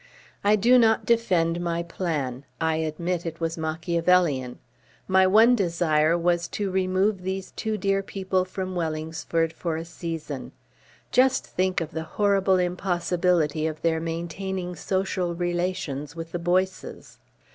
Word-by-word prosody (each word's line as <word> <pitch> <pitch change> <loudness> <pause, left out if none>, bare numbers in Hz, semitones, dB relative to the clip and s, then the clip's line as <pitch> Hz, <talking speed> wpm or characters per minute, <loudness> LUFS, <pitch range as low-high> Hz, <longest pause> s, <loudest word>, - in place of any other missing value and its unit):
I 205 +1 +5
do 240 +5 +5
not 225 -2 +3
defend 175 -8 +2
my 170 -1 -1
plan. 150 -7 -3 0.2
I 160 -1 +1
admit 165 +2 -2
it 165 -1 -6
was 165 0 -1
Machiavellian. 165 -4 +1 0.5
My 190 0 +5
one 225 +5 +6
desire 170 -4 +2
was 170 0 +1
to 200 -2 -1
remove 190 +1 +1
these 190 +1 -4
two 220 -1 -3
dear 195 0 +1
people 190 -1 -1
from 185 0 -5
Wellingsford 160 0 -2
for 165 -2 -3
a 165 - -5
season. 165 -2 -6 0.6
Just 260 +1 +3
think 185 0 0
of 165 -1 -4
the 160 - -3 0.2
horrible 195 -2 +3
impossibility 175 -3 +1
of 155 -1 -6
their 165 -1 +2
maintaining 175 +3 -4
social 185 -1 -1
relations 175 -5 -2
with 165 0 -7
the 175 - -3
Boyces 185 +2 -2
175 Hz, 135 wpm, -25 LUFS, 165-190 Hz, 0.6 s, one